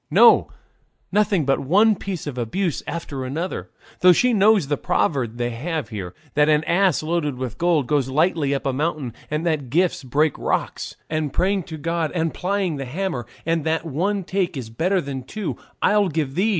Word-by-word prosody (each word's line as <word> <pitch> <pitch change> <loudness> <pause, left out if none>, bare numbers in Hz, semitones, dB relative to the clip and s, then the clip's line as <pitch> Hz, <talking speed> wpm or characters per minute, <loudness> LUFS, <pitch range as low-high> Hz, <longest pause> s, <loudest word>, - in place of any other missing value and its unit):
No, - - +6 0.6
nothing 205 -6 +2
but 135 0 +2
one 205 +10 +4
piece 185 -3 -5
of 145 -4 -5
abuse 140 - -1
after 145 -5 -4
another, 160 +8 -4 0.3
though 180 0 +7
she 245 +7 +3
knows 210 -4 +4
the 145 +1 0
proverb 125 -5 0
they 120 0 -1
have 145 +1 -3
here 95 -5 -6 0.2
that 150 +1 +3
'an 150 0 +4
ass 175 -1 +2
loaded 155 -3 -1
with 125 -3 -5
gold 170 -5 +2
goes 135 -1 +1
lightly 155 0 +1
up 135 - -4
a 135 - +1
mountain,' 145 -3 -2 0.2
and 150 +2 -2
that 155 -6 -1
'gifts 170 +2 +1
break 145 +3 +1
rocks,' - - -2
and 155 -2 -2
'praying 195 +2 +1
to 160 -1 -8
God 165 0 -1
and 165 -2 0
plying 185 -4 -1
the 135 - -4
hammer,' 140 - -3 0.2
and 165 -1 +1
that 160 +1 0
'one 190 +7 -1
"take" 185 -3 -1
is 115 -4 -6
better 180 - +1
than 135 -3 -5
two 195 +11 -4 0.3
"I'll 210 -1 +4
give 150 -4 -2
thee's." 195 +8 +2
160 Hz, 190 wpm, -22 LUFS, 135-180 Hz, 0.6 s, though